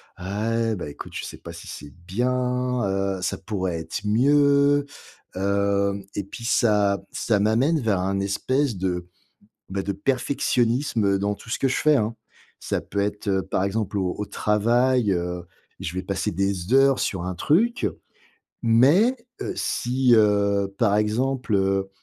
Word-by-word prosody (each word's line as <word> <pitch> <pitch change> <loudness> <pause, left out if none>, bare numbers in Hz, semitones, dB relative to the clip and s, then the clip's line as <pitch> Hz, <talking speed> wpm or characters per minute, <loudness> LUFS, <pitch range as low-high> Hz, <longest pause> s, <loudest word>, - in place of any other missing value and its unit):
«Ah 110 +4 -1
beh, 85 -6 -6
écoute, - - -10
je - - -4
sais - - -8
pas - - -10
si - - -11
c'est 75 -1 -9
bien, 125 +3 0
heu, 95 -1 -1
ça 90 - -1
pourrait 95 -3 -3
être 80 - -5
mieux». 140 +5 +4 0.5
Hem, 100 +1 0
et 100 - -3
puis 110 +4 -10
ça 105 -4 +2
ça 110 -3 +1
m'amène 120 +10 +2
vers 105 -7 0
un 95 +1 -1
espèce 130 +7 0
de, 90 -1 -2 0.6
beh, 95 0 -3
de 100 - -2
perfectionnisme 120 -2 +1
dans 100 +1 -1
tout 115 - -14
ce - - -2
que 135 - +2
je - - 0
fais, 155 -1 +4
hein. 115 -3 0 0.4
Ça - - -2
peut 100 - -4
être, 105 +1 -2
heu, 95 -1 +2
par 95 - -1
exemple, 105 0 -2
au 95 -2 0
au 105 - -3
travail, 115 +2 +2
heu, 90 0 -3 0.3
je 85 - -5
vais 95 +1 -3
passer 95 +1 -2
des 95 +3 -1
heures 135 0 +5
sur 95 -3 -2
un 90 0 -4
truc, 210 - +2 0.7
mais, 145 - +4 0.3
heu, - - -3
si 125 0 +1
heu, 100 -2 +3
par 105 -4 +3
exemple, 120 +2 0
heu, 95 0 +1
105 Hz, 160 wpm, -24 LUFS, 95-125 Hz, 0.7 s, heures